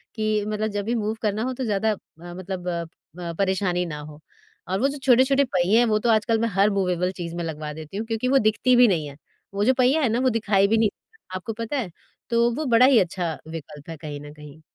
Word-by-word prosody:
कि 215 -1 0
मतलब 215 0 -1
जब 205 -1 -3
भी 235 +2 0
मूव 215 0 -1
करना 215 0 -1
हो 255 +1 -2
तो 260 - -5
ज़्यादा 220 -1 +1
अ, - - -8 0.4
मतलब 185 0 -6
अ 170 -1 -2 0.4
अ, 170 -1 -4
परेशानी 190 -2 +1
ना 150 -3 -6
हो। 150 0 -10 0.5
और 190 +1 0
वो 270 - +3
जो 285 - -5
छोटे-छोटे 265 +2 +4
पहिए 185 -1 +2
हैं 240 - +4
वो 215 -2 +2
तो 235 +2 0
आजकल 225 +1 +2
मैं 230 - +1
हर 200 +2 +4
मूवेबल 180 -1 0
चीज़ 170 -1 -5
में 170 - -3
लगवा 155 -2 -5
देती 160 +4 -8
हूँ 220 - -3
क्योंकि 225 +2 -1
वो 270 +2 +4
दिखती 220 +3 +3
भी 245 0 +7
नहीं 165 -6 0
है। 140 0 -11 0.4
वो 200 +1 0
जो 260 - +5
पहिया 260 +5 +3
है 255 - +2
ना 230 - 0
वो 260 0 +3
दिखाई 205 -4 +2
भी 225 - +2
नहीं 220 -1 +3 0.5
आपको 185 +4 -4
पता 230 +5 -4
है। 220 -9 -3 0.4
तो 235 0 +3
वो 310 +2 -3
बड़ा 245 +2 +7
ही 260 -3 +6
अच्छा 175 -3 -2
विकल्प 155 -2 -9
है 165 - -6
कहीं 150 -1 -7
न 145 0 -10
कहीं। 150 0 -13
210 Hz, 250 wpm, -24 LUFS, 175-230 Hz, 0.5 s, भी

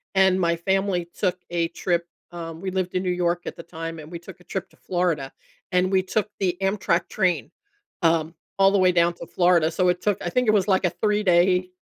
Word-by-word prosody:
and 190 -1 +4
my 170 -2 +2
family 190 0 0
took 185 -2 0
a 170 -1 0
trip. 170 -1 -1 0.3
Um, 165 -1 -7
we 190 - -3
lived 185 -1 -2
in 185 - 0
New 180 - -1
York 175 -1 0
at - - -6
the 170 - -8
time 165 -1 -7
and 155 +1 -10
we 175 - -6
took 175 +1 -12
a 180 - -20
trip 185 +1 -5
to - - -25
Florida, 175 -7 -1 0.4
and 180 +1 +2
we 190 -1 +4
took 210 +3 -1
the 180 -2 0
Amtrak 190 -3 0
train, 175 - 0 0.5
um, 165 -1 +2 0.2
all 195 0 +5
the 200 - +3
way 185 -1 +5
down 170 0 +3
to 170 - -9
Florida, 175 -2 +3
so 180 +1 +2
it 180 0 0
took 205 -2 +1
I 175 - -2
think 250 +5 +1
it 215 - +5
was 200 -2 +2
like 190 -1 +3
a 175 - +1
3 210 +4 0
day 180 0 +3
180 Hz, 235 wpm, -24 LUFS, 170-190 Hz, 0.5 s, all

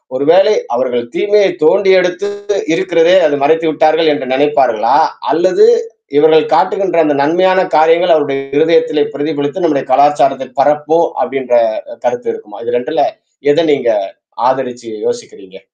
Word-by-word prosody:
ஒரு 130 - -2
வேளை 195 +4 +4 0.2
அவர்கள் 125 -2 -2
தீமையை 205 -1 +2 0.2
தோண்டி 195 +4 +3
எடுத்து 180 +3 -3 0.5
இருக்கிறதே 170 +2 +2
அது 145 - -1
மறைத்து 160 +3 +1
விட்டார்கள் 155 +1 +2
என்று 130 - -6
நெனைப்பார்களா? 145 +2 +1 0.4
அல்லது 415 +4 +3 0.5
இவர்கள் 155 +1 +4
காட்டுகின்ற 175 +2 0
அந்த 150 -2 0
நன்மையான 185 +5 +2 0.2
காரியங்கள் 165 +3 +3
அவருடைய 145 -3 -1 0.2
இருதயத்திலே 160 -1 +2
பிரதிபலித்து 145 +4 -4
நம்முடைய 150 -5 0
கலாச்சாரத்தில் 135 -1 +1
பரப்புவோம் 150 +4 +1
அப்டின்ற 130 -2 -3 0.5
கருத்து 485 -2 -3
இருக்குமா? 450 0 -12
இது 480 +1 -3
2ல - - -1 0.5
எது 170 - +2
நீங்க 140 - -1 0.6
ஆதரிச்சு 125 -3 -5 0.2
யோசிக்கிறீங்க? 420 - -8
160 Hz, 125 wpm, -13 LUFS, 145-180 Hz, 0.6 s, வேளை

